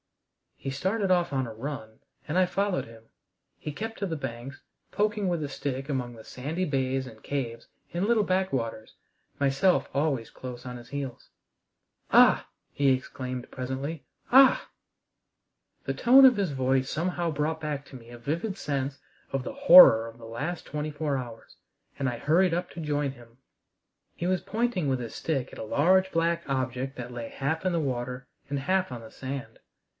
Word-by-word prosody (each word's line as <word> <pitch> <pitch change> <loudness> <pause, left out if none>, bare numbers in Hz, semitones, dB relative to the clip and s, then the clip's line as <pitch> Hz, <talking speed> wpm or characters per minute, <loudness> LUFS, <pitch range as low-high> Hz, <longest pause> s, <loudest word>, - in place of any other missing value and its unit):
He 135 - -6
started 190 +8 -1
off 175 -4 +2
on 130 -2 0
a 110 - -7
run, 110 -2 -6 0.3
and 155 - -1
I 185 - +5
followed 195 +1 -1
him. 115 -1 -15 0.5
He 150 - -5
kept 225 +8 -5
to 200 - -1
the 165 - -2
banks, 130 0 -6 0.3
poking 210 -1 0
with 170 -3 0
a - - -2
stick 135 0 -4
among 125 -4 -2
the 110 -1 -12
sandy 155 +11 -3
bays 130 -2 -1
and 110 -3 -13
caves 120 -5 -4 0.3
and 175 +3 0
little 225 -1 +3
back 190 0 0
waters, 115 -3 -3 0.5
myself 140 +7 +2
always 140 -5 0
close 125 -1 -8
on 125 -1 -6
his 120 - -13
heels. 140 -3 -6 0.8
"Ah!" - - +6 0.2
he 140 -1 +2
exclaimed 130 -1 -2
presently, 135 +4 -4 0.3
"ah!" 265 +1 +6 1.2
The - - -2
tone 265 +3 +7
of 250 -4 +7
his 195 -6 0
voice 130 0 +1
somehow 170 +1 -1
brought 155 +2 -1
back 145 -2 -3
to 135 - -13
me 120 -2 -12
a 120 - -10
vivid 170 - -2
sense 140 -1 -2 0.3
of 135 -1 -1
the - - -5
horror 270 - +9
of 115 0 -11
the 115 - -10
last 145 +10 -4
twenty 150 0 -3
four 145 -2 -1
hours, 120 -3 -8 0.4
and 135 - -1
I 120 - -4
hurried 165 +7 +3
up 175 +1 -1
to 170 - -9
join 145 -3 -1
him. 120 -2 -16 0.8
He 175 - -3
was 185 -1 +1
pointing 220 -7 -1
with 130 -2 +1
his 120 -2 -6
stick 140 -6 -2
at - - -9
a - - -4
large 185 +11 +3
black 170 0 +1
object 130 0 -2
that 125 0 -6
lay 115 -1 -5
half 160 +6 -2
in 185 - +2
the 170 - +1
water 125 -2 -3 0.2
and 140 0 -2
half 185 +3 0
on 120 -2 -6
the 110 - -12
sand. 135 0 -6
140 Hz, 180 wpm, -28 LUFS, 125-175 Hz, 1.2 s, horror